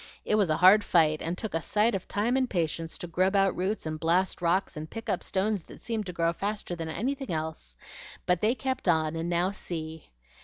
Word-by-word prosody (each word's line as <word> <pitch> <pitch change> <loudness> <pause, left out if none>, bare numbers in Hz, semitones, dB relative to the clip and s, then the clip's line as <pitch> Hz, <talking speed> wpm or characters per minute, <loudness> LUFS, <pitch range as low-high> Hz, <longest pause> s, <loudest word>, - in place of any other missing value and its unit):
It - - 0
was 205 -5 +3
a 155 - +2
hard 190 +4 +7
fight, 155 -3 +3
and 170 +2 -2
took 220 +1 -4
a 165 - 0
sight 215 +7 +2
of 190 -2 -3
time 225 +5 0
and 260 -2 +1
patience 165 -2 -2
to - - -5
grub 185 +3 +1
out 195 -1 +3
roots 190 +2 -2
and 155 0 -4
blast 175 +4 +1
rocks 180 +3 +1
and 155 +1 -6
pick 225 0 -8
up - - 0
stones 200 +1 -1
that - - -14
seemed 220 -3 -2
to - - -3
grow 170 -1 0
faster 200 -1 -3
than 165 -1 -5
anything 265 - -3
else. 155 - -4 0.5
But 180 -1 +1
they 225 +4 +3
kept 260 -4 -3
on, 160 -2 +2
and 165 +1 -2
now 175 +2 +1
see!" 160 -5 -6
180 Hz, 225 wpm, -28 LUFS, 165-210 Hz, 0.5 s, hard